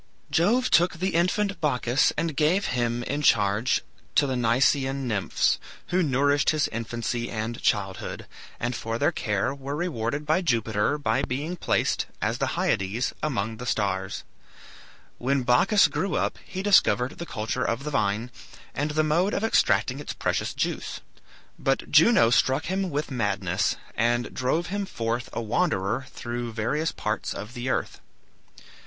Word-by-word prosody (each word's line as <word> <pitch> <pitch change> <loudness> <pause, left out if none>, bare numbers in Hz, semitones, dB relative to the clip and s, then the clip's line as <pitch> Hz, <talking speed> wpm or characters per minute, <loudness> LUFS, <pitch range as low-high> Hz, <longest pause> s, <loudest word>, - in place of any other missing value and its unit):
Jove 235 +10 +2
took 175 +2 +4
the 185 +3 -2
infant 195 +4 +1
Bacchus 130 -2 +2
and 160 -1 -1
gave 165 +7 +2
him 120 -1 0
in 145 +4 -2
charge 105 -2 +3 0.3
to 145 - +5
the 135 - -1
Nysaean 130 +3 +2
nymphs, 105 -5 +1 0.3
who 185 +1 +2
nourished 145 -1 +2
his 155 -2 +2
infancy 115 +1 -3
and 110 +1 -4
childhood, 95 -3 -1 0.3
and 120 0 -2
for 115 +1 -3
their - - +2
care 105 +4 -1
were 140 +1 -5
rewarded 150 -4 -2
by 155 +5 +2
Jupiter 115 - +1
by 130 -3 0
being 145 +6 -3
placed, - - 0
as - - -1
the - - 0
Hyades, 100 +6 0
among 115 -7 -2
the 125 - -7
stars. 95 -4 -1 1.0
When 135 +1 +1
Bacchus 175 - +5
grew 195 - -2
up - - -1
he 190 0 -5
discovered 140 -10 +3
the 170 - -5
culture 110 +3 -2
of 115 +3 -1
the 150 - -4
vine 105 -1 0 0.4
and 145 +2 -1
the 155 +1 +1
mode 170 +7 +1
of 200 - -1
extracting 225 - +2
its - - -5
precious - - -2
juice; - - -3 0.6
but - - -1
Juno 170 - +6
struck 130 +1 +2
him 190 +1 -1
with 150 -1 -3
madness, 100 -5 0 0.2
and 120 +1 +1
drove 145 +7 0
him 205 -1 -2
forth 120 -2 -3
a - - -3
wanderer 120 - 0
through 120 -1 -5
various 135 +9 -1
parts 105 0 -3
of 105 +4 -7
the 125 0 -4
earth. - - -2
125 Hz, 155 wpm, -26 LUFS, 115-155 Hz, 1.0 s, Juno